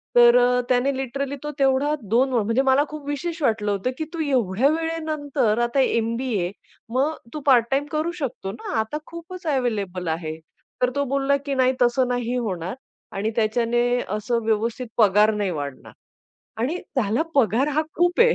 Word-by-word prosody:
तर 240 0 +8
अ, 250 0 +4
त्याने 260 +2 +2
लिटरली 270 +1 -3
तो 295 - -3
तेवढा 270 +2 +3 0.2
2 250 +5 +3
म्हणजे 230 +2 +2
मला 270 +1 +4
खूप 300 -2 -8
विशेष 325 +3 -3
वाटलं 215 -4 +1
होतं, 200 +5 -1
की 315 - -2
"तू 335 - -5
एवढ्या 250 -4 +2
वेळेनंतर 305 -7 -1
आता 240 +3 0
एम-बी-ए 230 -6 0 0.4
मग 280 +5 +1 0.2
तू 305 - -4
पार्ट 245 -4 +6
टाईम 275 +2 +1
करू 310 +2 0
शकतो 250 -8 -4
ना. 225 - -7
आता 220 +7 -2
खूपच 340 +2 -9
अव्हेलेबल 210 - -1
आहे." 160 -1 -3 0.4
तर 250 - +4
तो 285 - +1
बोलला, 275 0 +2
की 280 0 -4
"नाही, 260 0 +3
तसं 245 +1 +3
नाही 245 0 -1
होणार 185 -5 -3 0.4
आणि 210 +3 0
त्याच्याने 230 +2 +1 0.4
असं 230 +3 -1
व्यवस्थित 225 +3 0
पगार 210 0 +5
नाही 205 -3 -1
वाढणार" 145 -4 -6 0.7
आणि 270 +9 0 0.2
त्याला 230 +3 +2
पगार 260 +1 +3
हा 310 - +3
खूप 350 +4 +2
आहे. 475 0 +6
250 Hz, 165 wpm, -23 LUFS, 220-280 Hz, 0.7 s, तर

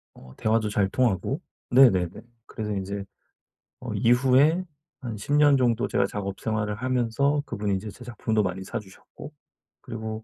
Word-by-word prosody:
어 65 0 -14
대화도 110 -1 +1
잘 100 -2 +1
통하고. 125 - 0 0.3
네네네. 95 -10 +4 0.2
그래서 105 -3 -5
이제 100 +1 -4 0.7
어 - - -6
이후에 135 +8 +4 0.4
한 120 -4 -5
10 125 +8 -4
년 145 -1 +5
정도 120 -1 +1
제가 - - +1
작업 100 -1 -5
생활을 105 -1 -2
하면서 130 +4 0
그분이 100 -1 -1
이제 100 +3 -5
제 125 - -12
작품도 110 -2 -1
많이 95 0 -3
사 - - -5
주셨고, 105 +8 -13 0.5
그리고 110 -3 -6
110 Hz, 305 characters per minute, -26 LUFS, 100-130 Hz, 0.7 s, 년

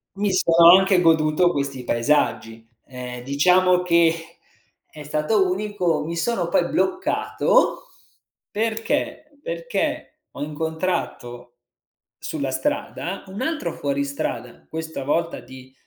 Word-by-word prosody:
Mi 205 +1 0
sono 170 -1 +6
anche 190 -1 +3
goduto 165 +1 +3
questi 140 -4 -4
paesaggi. 115 -3 0 0.2
Ehm, 125 -1 -8
diciamo 180 +7 +3
che 170 -1 +1 0.5
è 150 -1 -12
stato 155 +7 +1
unico 185 -5 -1
mi 170 +2 -5
sono 235 +7 -1
poi - - +2
bloccato 375 +6 +1 0.7
perché, 225 +7 -2
perché - - -4
ho - - -9
incontrato 155 -6 -4 0.6
sulla 140 -4 -4
strada 280 - -3
un 190 +4 -7
altro 310 +3 -2
fuoristrada, 140 - -4
questa 160 -3 -6
volta 165 +4 -1
di, 130 0 -14
165 Hz, 105 wpm, -22 LUFS, 140-195 Hz, 0.7 s, sono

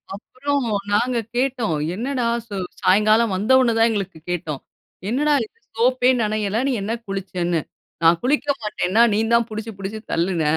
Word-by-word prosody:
அப்புறம் 275 +5 -3 0.3
நாங்க 240 +3 +2 0.2
கேட்டோம். 245 -8 0 0.2
"என்னடா 250 +2 -2 0.2
ஸோ 205 - -6 0.3
"சாயங்காலம் 215 +2 +4
வந்த 210 +7 0
உடனே 240 -3 +3
தான் 225 +1 +5
எங்களுக்கு 195 -6 -3
கேட்டோம். 160 -5 -3 0.5
'என்னடா 295 +6 +2
இது - - -24 0.2
சோப்பே 250 +1 +3
நனையல, 215 +1 0
நீ - - +1
என்ன 205 - -3 0.2
குளிச்சனு?' 180 -4 -2 0.4
"நான் 165 +1 +5
குளிக்க 290 +2 +1
மாட்டேன்னுனே 210 +1 +2
நீ 210 - +2
தான் 235 -1 +4
புடிச்சு 220 +1 -5
புடிச்சு 200 +3 -5
தள்ளுன, 170 -1 0
215 Hz, 150 wpm, -21 LUFS, 195-245 Hz, 0.5 s, தான்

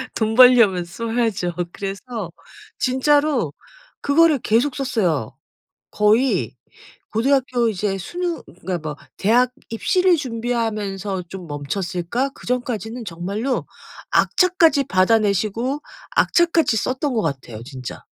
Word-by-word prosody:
돈 220 0 0
벌려면 235 -8 +6
써야죠. 225 -2 -2 0.2
그래서 200 -1 -5 0.5
진짜로 265 - +2 0.5
그거를 300 0 +4
계속 240 +6 +1
썼어요. 185 - -1 0.6
거의 220 +5 +2 0.5
고등학교 245 0 +1
이제 195 -1 -1
수능 345 - -4 0.2
그러니까 180 0 -2
뭐 150 -2 -6 0.2
대학 245 +5 +3 0.2
입시를 360 +10 +2
준비하면서 220 - -3
좀 185 -2 -8
멈췄을까? 175 - -3
그 - - -14
전까지는 240 -2 -3
정말로 200 +9 -3 0.4
악착같이 335 -6 +3
받아 190 0 +3
내시고 215 +7 -1 0.4
악착같이 335 -8 +3
썼던 260 +5 -1
것 225 - +2
같아요 130 -7 -4
진짜. 130 -2 -8
225 Hz, 265 characters per minute, -21 LUFS, 190-260 Hz, 0.6 s, 벌려면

